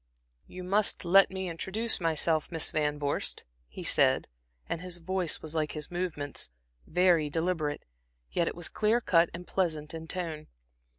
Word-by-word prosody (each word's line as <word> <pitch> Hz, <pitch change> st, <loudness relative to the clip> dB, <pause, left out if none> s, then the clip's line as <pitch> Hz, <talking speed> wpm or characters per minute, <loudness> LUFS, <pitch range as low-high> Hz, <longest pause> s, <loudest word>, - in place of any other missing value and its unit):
"You 185 Hz, 0 st, -8 dB
must 200 Hz, +1 st, +2 dB
let 195 Hz, +3 st, +7 dB
me 190 Hz, -1 st, -3 dB
introduce 190 Hz, +6 st, -1 dB
myself, 160 Hz, -1 st, +1 dB
Miss 165 Hz, -2 st, 0 dB
Van 150 Hz, -1 st, 0 dB
Vorst," 145 Hz, -1 st, -1 dB, 0.2 s
he -, -, -8 dB
said, -, -, +3 dB, 0.4 s
and 165 Hz, -, -3 dB
his 180 Hz, -1 st, -3 dB
voice 180 Hz, 0 st, -1 dB
was 155 Hz, 0 st, -5 dB
like 155 Hz, -2 st, -1 dB
his 150 Hz, +1 st, -5 dB
movements, 160 Hz, -, -3 dB, 0.4 s
very 175 Hz, -3 st, +4 dB
deliberate, 160 Hz, -2 st, -1 dB, 0.5 s
yet 170 Hz, -, +1 dB
it -, -, -2 dB
was 175 Hz, -1 st, -3 dB
clear 220 Hz, +2 st, +2 dB
cut 170 Hz, -7 st, +4 dB
and 175 Hz, +1 st, -7 dB
pleasant 160 Hz, -6 st, -1 dB
in 160 Hz, 0 st, -7 dB
tone. 160 Hz, -4 st, -4 dB
170 Hz, 160 wpm, -30 LUFS, 155-185 Hz, 0.5 s, let